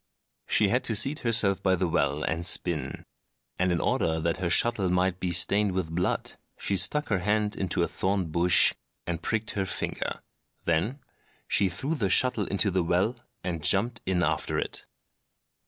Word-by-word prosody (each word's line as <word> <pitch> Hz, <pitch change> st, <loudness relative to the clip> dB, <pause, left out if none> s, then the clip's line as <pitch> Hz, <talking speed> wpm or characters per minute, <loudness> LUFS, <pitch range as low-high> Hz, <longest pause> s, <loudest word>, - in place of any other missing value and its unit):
She 105 Hz, -2 st, +2 dB
had 125 Hz, +4 st, +1 dB
to 115 Hz, -, 0 dB
seat 140 Hz, +8 st, +3 dB
herself 110 Hz, -5 st, +3 dB
by 95 Hz, -1 st, +2 dB
the 90 Hz, 0 st, -1 dB
well 75 Hz, -3 st, 0 dB
and 80 Hz, +1 st, -2 dB
spin; 80 Hz, -6 st, 0 dB, 0.5 s
and 90 Hz, 0 st, +1 dB
in 85 Hz, -, 0 dB
order 80 Hz, 0 st, 0 dB
that 85 Hz, +1 st, -1 dB
her 90 Hz, -2 st, -2 dB
shuttle 110 Hz, -2 st, +2 dB
might 90 Hz, 0 st, 0 dB
be 90 Hz, -, -2 dB
stained 100 Hz, +3 st, +3 dB
with 90 Hz, -3 st, -3 dB
blood, 90 Hz, +2 st, -2 dB, 0.2 s
she 100 Hz, -, -1 dB
stuck 150 Hz, -, +2 dB
her 100 Hz, -4 st, +1 dB
hand 105 Hz, +2 st, 0 dB
into 95 Hz, -3 st, -1 dB
a -, -, 0 dB
thorn 95 Hz, -3 st, -2 dB
bush 85 Hz, +2 st, +4 dB, 0.3 s
and 85 Hz, -1 st, -4 dB
pricked 110 Hz, +3 st, -2 dB
her 95 Hz, -2 st, -3 dB
finger. -, -, -4 dB, 0.4 s
Then 95 Hz, -, -1 dB, 0.5 s
she 100 Hz, -1 st, +2 dB
threw 135 Hz, -, -3 dB
her 110 Hz, -11 st, -1 dB
shuttle 120 Hz, 0 st, +2 dB
into 100 Hz, +1 st, +1 dB
the 95 Hz, 0 st, +1 dB
well, 90 Hz, +8 st, 0 dB, 0.3 s
and 85 Hz, -4 st, -4 dB
jumped 115 Hz, +5 st, +2 dB
in 90 Hz, -2 st, +1 dB
after 80 Hz, 0 st, -1 dB
it. -, -, -4 dB
95 Hz, 175 wpm, -27 LUFS, 85-105 Hz, 0.5 s, bush